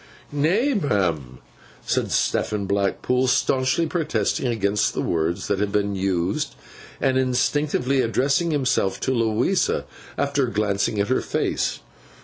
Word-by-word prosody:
'Nay, 180 Hz, -, +2 dB
ma'am,' 90 Hz, -, -1 dB, 0.5 s
said -, -, 0 dB
Stephen 105 Hz, -2 st, 0 dB
Blackpool, 100 Hz, +6 st, 0 dB
staunchly 130 Hz, +5 st, +2 dB
protesting 150 Hz, -, -1 dB
against 105 Hz, -3 st, 0 dB
the -, -, -1 dB
words 85 Hz, +3 st, -1 dB
that 100 Hz, -, 0 dB
had 105 Hz, 0 st, 0 dB
been 100 Hz, 0 st, 0 dB
used, 95 Hz, -2 st, -1 dB, 0.4 s
and 130 Hz, -1 st, +2 dB
instinctively 130 Hz, +1 st, +1 dB
addressing 135 Hz, +7 st, +1 dB
himself 125 Hz, -10 st, 0 dB
to 130 Hz, -, -1 dB
Louisa, 115 Hz, -, +1 dB, 0.3 s
after 140 Hz, -2 st, +1 dB
glancing 105 Hz, -1 st, 0 dB
at 100 Hz, -, 0 dB
her 130 Hz, -, +2 dB
face. -, -, -1 dB
120 Hz, 125 wpm, -23 LUFS, 100-140 Hz, 0.5 s, Nay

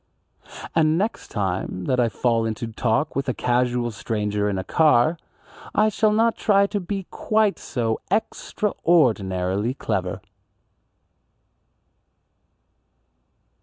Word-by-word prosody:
And 160 Hz, 0 st, +3 dB
next 210 Hz, +5 st, -2 dB
time 95 Hz, -2 st, -3 dB
that 125 Hz, -, +1 dB
I 120 Hz, -1 st, +3 dB
fall 115 Hz, +2 st, +1 dB
into 110 Hz, +2 st, -4 dB
talk 115 Hz, +5 st, -1 dB
with 135 Hz, -1 st, -1 dB
a 130 Hz, -, -1 dB
casual 125 Hz, -1 st, 0 dB
stranger 105 Hz, -1 st, -2 dB
in 100 Hz, -, -2 dB
a 95 Hz, -, -3 dB
car, 155 Hz, -, +3 dB, 0.6 s
I 215 Hz, +1 st, +4 dB
shall 215 Hz, +1 st, +2 dB
not 225 Hz, +2 st, +2 dB
try 200 Hz, -1 st, +3 dB
to 205 Hz, +1 st, -2 dB
be 195 Hz, 0 st, -4 dB
quite 215 Hz, -2 st, +1 dB
so 115 Hz, -3 st, -2 dB
extraordinarily 120 Hz, -, 0 dB
clever. 95 Hz, -6 st, -3 dB
125 Hz, 110 wpm, -23 LUFS, -, 0.6 s, I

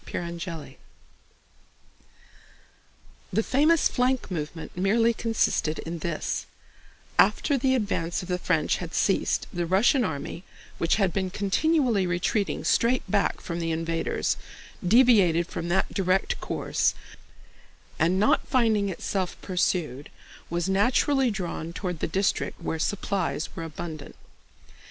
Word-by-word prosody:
CHAPTER 170 Hz, -2 st, -5 dB
II 135 Hz, -, -16 dB, 2.5 s
The 220 Hz, +4 st, +1 dB
famous 305 Hz, +7 st, +3 dB
flank 250 Hz, -3 st, 0 dB
movement 160 Hz, -1 st, -5 dB
merely 225 Hz, +6 st, +3 dB
consisted 225 Hz, -9 st, 0 dB
in 165 Hz, +1 st, -5 dB
this: 165 Hz, -1 st, -3 dB, 0.7 s
after 285 Hz, -, +4 dB
the 260 Hz, 0 st, +2 dB
advance 185 Hz, -7 st, -1 dB
of -, -, -9 dB
the 180 Hz, -1 st, -1 dB
French 170 Hz, -3 st, +1 dB
had 175 Hz, -2 st, -6 dB
ceased, 195 Hz, -, +1 dB
the 175 Hz, -2 st, -2 dB
Russian 230 Hz, -, +4 dB
army, 160 Hz, 0 st, -4 dB, 0.4 s
which 165 Hz, -, +2 dB
had 195 Hz, -5 st, +1 dB
been 190 Hz, -1 st, -1 dB
continually 210 Hz, -, +1 dB
retreating 180 Hz, +4 st, -1 dB
straight 240 Hz, +2 st, +2 dB
back 200 Hz, -2 st, 0 dB
from 170 Hz, -1 st, -4 dB
the 165 Hz, -1 st, -2 dB
invaders, 165 Hz, 0 st, -1 dB, 0.5 s
deviated 195 Hz, -5 st, +5 dB
from 170 Hz, -, -5 dB
that 190 Hz, +2 st, 0 dB
direct 190 Hz, -1 st, 0 dB
course -, -, 0 dB, 1.0 s
and, 175 Hz, +4 st, +2 dB
not 215 Hz, -, +3 dB
finding 220 Hz, -6 st, +2 dB
itself 185 Hz, 0 st, -3 dB
pursued, 170 Hz, -7 st, -1 dB, 0.4 s
was 170 Hz, +1 st, -1 dB
naturally 250 Hz, +7 st, +3 dB
drawn 175 Hz, -5 st, -4 dB
toward 180 Hz, -3 st, -4 dB
the -, -, -1 dB
district 190 Hz, +4 st, -1 dB
where 160 Hz, -2 st, -3 dB
supplies 190 Hz, -3 st, -2 dB
were -, -, -5 dB
abundant. 160 Hz, -1 st, -7 dB
185 Hz, 125 wpm, -26 LUFS, 170-220 Hz, 2.5 s, deviated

